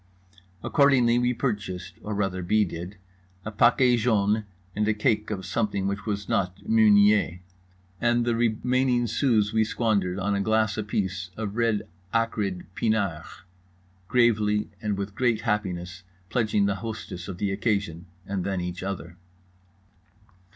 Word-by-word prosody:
Accordingly 125 -4 +4
we 125 0 +2
purchased 100 -8 -3
(or 105 0 -4
rather 95 -2 -1
B. 105 +4 +2
did) 90 +3 -7 0.5
a 110 - -4
paquet 120 +3 +4
jaune 110 -2 +1 0.3
and 105 0 0
a 110 - +2
cake 105 -1 +1
of 95 -4 -4
something 100 -3 -1
which 100 +2 -4
was 100 -1 -2
not 90 0 -2
Meunier. 105 -4 +4 0.6
And 120 0 +2
the 120 -1 +1
remaining 120 +2 +1
sous 110 -3 +1
we 110 0 +3
squandered 105 -5 0
on 100 +1 -1
a 100 - 0
glass 110 +1 +1
apiece 95 -4 -2
of 105 -2 -4
red 115 -3 +1 0.3
acrid 105 -5 -1
pinard, 100 -8 0 0.8
gravely 105 -3 +2
and 105 -2 -1
with 100 0 -4
great 120 -2 +1
happiness 95 -5 -2 0.3
pledging 110 -4 +2
the 100 -1 0
hostess 110 -6 -6
of 95 -3 -6
the 100 +1 -1
occasion 100 -5 -1 0.2
and 95 -2 -3
then 95 -1 -2
each 90 0 -4
other. 90 -3 -5
105 Hz, 140 wpm, -26 LUFS, 95-115 Hz, 0.8 s, Accordingly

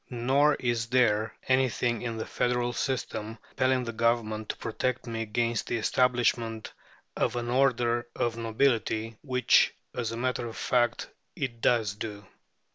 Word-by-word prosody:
Nor 135 +5 +3
is 120 -2 -1
there 110 -3 +2
anything 125 -3 +1
in 115 -2 -3
the 110 - -3
federal 120 0 0
system 115 -4 -3
compelling 130 0 +1
the 115 - -4
Government 110 -2 0
to - - -3
protect 125 +2 -2
me 115 -2 -4
against 115 +1 -1
the 120 - 0
establishment 115 -1 +1 0.4
of - - 0
an 120 0 -2
order 120 -2 +2
of 120 -1 0
nobility, 115 -1 0
which, 125 -4 +3 0.2
as 115 -3 -2
a 115 - -5
matter 125 -1 -1
of 115 - -8
fact, 120 -1 +1 0.3
it 120 -4 -4
does 110 -5 +2
do. 105 -1 -7
120 Hz, 145 wpm, -28 LUFS, 115-125 Hz, 0.4 s, Nor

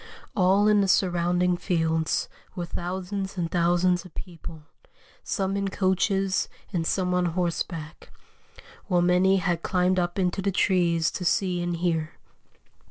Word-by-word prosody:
All 195 +2 +4
in 210 -1 +5
the 195 - +1
surrounding 180 -1 +2
fields 160 -3 0 0.3
were 175 - -3
thousands 190 +3 -4
and 170 -2 -2
thousands 175 0 +2
of 180 - -15
people, 165 -3 -9 0.6
some 195 -2 -1
in 200 0 -1
coaches 190 0 +1 0.2
and 165 -2 -1
some 180 -2 0
on 180 0 +2
horseback, 170 -2 -3 0.8
while 180 -3 +2
many 180 +2 +4
had 175 -3 -1
climbed 185 0 +1
up 175 +1 -2
into 185 0 0
the 200 - 0
trees 170 -4 +2
to 185 - -5
see 180 0 +1
and 175 0 -2
hear." 165 -2 -1
180 Hz, 140 wpm, -26 LUFS, 175-190 Hz, 0.8 s, in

